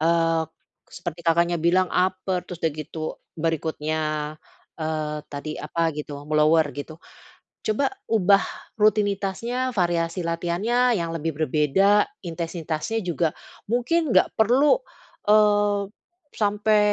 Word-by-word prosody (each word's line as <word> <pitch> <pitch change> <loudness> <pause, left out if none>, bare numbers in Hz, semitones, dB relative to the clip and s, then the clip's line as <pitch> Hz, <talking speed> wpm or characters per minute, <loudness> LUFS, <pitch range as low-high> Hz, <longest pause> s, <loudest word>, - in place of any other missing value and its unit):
eee, 165 0 +2 0.5
seperti 170 0 -6
Kakaknya 170 +1 +3
bilang 180 +3 +2
upper, 185 0 0
terus 180 - -7
dah 160 - +2
gitu 155 +1 -6 0.2
berikutnya, 160 -1 -1 0.8
eee, 155 -1 -2
tadi 145 +1 -6
apa 165 +2 -1
gitu 150 -1 -6
me 155 - -4
lower 155 +1 +5
gitu. 145 +2 -7 0.7
Coba 220 +6 +1 0.2
ubah 200 -2 +4 0.4
rutinitasnya, 215 +4 +1
variasi 175 -3 0
latihannya 200 +9 +1
yang 165 -1 -3
lebih 165 +1 -2
berbeda, 155 +7 +3 0.2
intensitasnya 165 +3 -3
juga. 170 -2 0 0.4
Mungkin 280 +7 +1
nggak - - +5
perlu, 250 - +4 0.5
eee, 205 -1 +4 0.5
sampe 210 0 +2
170 Hz, 110 wpm, -24 LUFS, 160-210 Hz, 0.8 s, lower